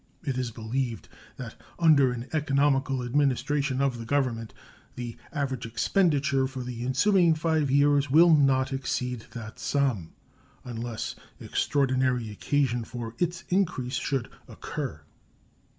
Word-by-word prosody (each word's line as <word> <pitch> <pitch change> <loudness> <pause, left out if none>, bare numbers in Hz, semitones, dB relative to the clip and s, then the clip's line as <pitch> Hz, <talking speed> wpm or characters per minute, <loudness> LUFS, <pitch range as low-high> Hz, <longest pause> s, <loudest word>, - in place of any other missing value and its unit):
It 135 -3 -2
is 125 -2 -2
believed 115 +1 -3 0.3
that - - -7 0.2
under 150 -6 +5
an 120 +1 -5
economical 140 -3 +1
administration 140 +1 +1
of 130 -4 0
the 115 - -6
Government 120 -4 -1 0.4
the 120 -1 -5 0.2
average 130 -5 -2
expenditure 140 - +2
for 130 -1 -6
the 120 -1 -5
ensuing 170 +6 +3
five 155 -2 +1
years 145 0 +3
will 165 +4 +7
not 135 -1 +2
exceed 125 -3 -3
that 110 -2 -8
sum, 130 - 0 0.5
unless 120 -2 -4 0.3
extraordinary 130 -4 0
occasion 120 +2 0
for 115 0 -6
its 175 +1 -1
increase 170 -10 0
should 130 0 -2 0.2
occur. - - -6
130 Hz, 120 wpm, -27 LUFS, 120-145 Hz, 0.5 s, will